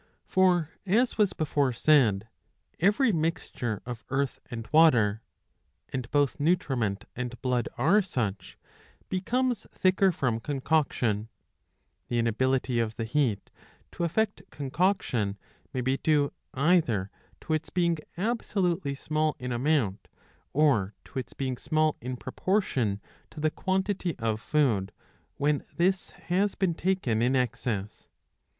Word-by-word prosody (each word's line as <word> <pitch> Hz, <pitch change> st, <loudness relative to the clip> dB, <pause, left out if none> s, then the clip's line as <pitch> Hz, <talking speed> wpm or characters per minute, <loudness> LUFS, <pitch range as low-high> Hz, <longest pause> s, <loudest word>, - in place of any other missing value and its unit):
For, 180 Hz, -4 st, +3 dB
as 220 Hz, +5 st, +1 dB
was 205 Hz, -3 st, +4 dB
before 145 Hz, -3 st, +1 dB
said, 115 Hz, -7 st, +3 dB, 0.5 s
every 210 Hz, -, +4 dB
mixture 155 Hz, -, -2 dB
of 120 Hz, -2 st, -6 dB
earth 135 Hz, +1 st, -1 dB
and 115 Hz, -2 st, -6 dB
water 120 Hz, -10 st, +5 dB, 0.3 s
— 80 Hz, +5 st, -47 dB
and 130 Hz, -3 st, -3 dB
both 145 Hz, +2 st, +1 dB
nutriment 135 Hz, -, 0 dB
and 125 Hz, -1 st, -5 dB
blood 125 Hz, -2 st, 0 dB
are 195 Hz, +8 st, +4 dB
such 110 Hz, -, -3 dB, 0.3 s
— -, -, -32 dB
becomes 240 Hz, +4 st, 0 dB
thicker 185 Hz, +1 st, +3 dB
from 125 Hz, -8 st, -1 dB
concoction 130 Hz, -6 st, 0 dB
^"^ -, -, -20 dB, 0.8 s
The 120 Hz, -, -1 dB
inability 125 Hz, +2 st, +1 dB
of 115 Hz, -1 st, -1 dB
the 115 Hz, -, -3 dB
heat 115 Hz, -4 st, 0 dB, 0.4 s
to -, -, -4 dB
effect 205 Hz, +5 st, 0 dB
concoction 135 Hz, -, 0 dB, 0.3 s
may 130 Hz, -, -2 dB
be 130 Hz, +2 st, +1 dB
due 145 Hz, -2 st, +2 dB, 0.2 s
either 130 Hz, -, +2 dB, 0.3 s
to 160 Hz, -, -2 dB
its 155 Hz, 0 st, -1 dB
being 170 Hz, -2 st, +1 dB, 0.2 s
absolutely 185 Hz, -7 st, 0 dB
small 155 Hz, +2 st, 0 dB
in 125 Hz, -2 st, -5 dB
amount, 120 Hz, -6 st, 0 dB, 0.4 s
or 130 Hz, -10 st, +2 dB
to 135 Hz, -, -5 dB
its 120 Hz, -7 st, -7 dB
being 130 Hz, -2 st, -3 dB
small 155 Hz, +2 st, +1 dB
in 125 Hz, +1 st, -4 dB
proportion 130 Hz, -, 0 dB, 0.3 s
to 155 Hz, -, -11 dB
the 155 Hz, 0 st, +1 dB
quantity 190 Hz, -3 st, -1 dB
of 110 Hz, -2 st, -1 dB
food, 110 Hz, -11 st, +1 dB, 0.4 s
when 145 Hz, 0 st, +1 dB
this 185 Hz, +2 st, +1 dB, 0.2 s
has 195 Hz, +3 st, +2 dB
been 185 Hz, -3 st, +1 dB
taken 165 Hz, -11 st, 0 dB
in 125 Hz, +3 st, +2 dB
excess. 115 Hz, -5 st, -2 dB
140 Hz, 130 wpm, -28 LUFS, 120-175 Hz, 0.8 s, water